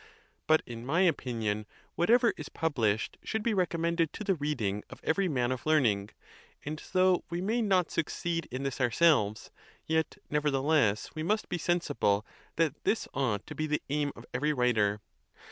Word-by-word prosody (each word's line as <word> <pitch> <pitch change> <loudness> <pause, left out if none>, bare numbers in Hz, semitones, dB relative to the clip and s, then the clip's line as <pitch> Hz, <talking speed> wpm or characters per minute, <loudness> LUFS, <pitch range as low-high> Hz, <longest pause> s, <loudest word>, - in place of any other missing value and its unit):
But, 155 0 +4
in 115 -1 -8
my 155 +8 +1
opinion, 115 - 0 0.3
whatever 230 +7 +4
is 150 - -8
pub 160 -2 -2
lished 110 -2 +1
should 220 -1 -2
be 235 - +1
recommended 170 -3 +1
to - - -6
the 195 -2 +2
reading 130 - -2
of - - -11
every 190 +4 +1
man 125 -6 0
of 130 - -3
learning; 115 -10 +2 0.6
and 155 +2 -4
though 185 -1 +4
we 170 - -3
may 220 +6 0
not 190 -5 +2
succeed 165 0 -2
in 130 +2 -4
this 135 -1 -3
ourselves, 120 -4 +3 0.3
yet 160 -1 0
nevertheless 145 -6 +1
we 155 - -5
must 215 +7 0
be 175 - -2
sensible 145 - +1 0.3
that 155 -3 0
this 220 - 0
ought 120 -7 -1
to - - -8
be 155 - -2
the 150 0 -1
aim 145 -1 0
of 115 - -12
every 150 +4 +1
writer. 110 -5 +2
150 Hz, 170 wpm, -30 LUFS, 120-170 Hz, 0.6 s, But